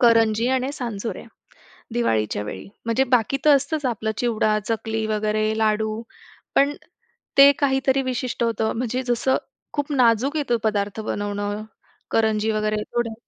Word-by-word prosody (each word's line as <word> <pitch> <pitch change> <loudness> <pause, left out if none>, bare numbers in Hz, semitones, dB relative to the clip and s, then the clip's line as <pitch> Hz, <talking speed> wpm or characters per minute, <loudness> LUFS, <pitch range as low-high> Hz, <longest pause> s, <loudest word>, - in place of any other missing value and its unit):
करंजी 230 -1 +4
आणि 260 +1 0
सांजोऱ्या 235 -6 -5 0.7
दिवाळीच्या 110 - 0
वेळी 95 -2 -7 0.2
म्हणजे 230 +3 +2
बाकी 250 +3 +3
तर 295 -1 +8
असतंच 285 +2 -1
आपलं 220 -3 -1
चिवडा, 215 -3 +1
चकली 220 -1 -2
वगैरे 215 0 0
लाडू. 220 0 0 0.5
पण 285 +1 +3 0.6
ते 280 +1 +10
काहीतरी 270 -1 +2
विशिष्ट 255 -2 -2
होतं. 225 -1 0
म्हणजे 250 +1 -1
जसं 245 +2 +1 0.4
खूप 290 0 -2
नाजूक 255 +1 +3
आहे 295 - +1
तो 240 - +3
पदार्थ 205 -1 -1
बनवणं, 205 0 -3 0.5
करंजी 220 -1 +2
वगैरे 215 0 0
थोडं. 240 -2 0
225 Hz, 135 wpm, -23 LUFS, 215-260 Hz, 0.7 s, ते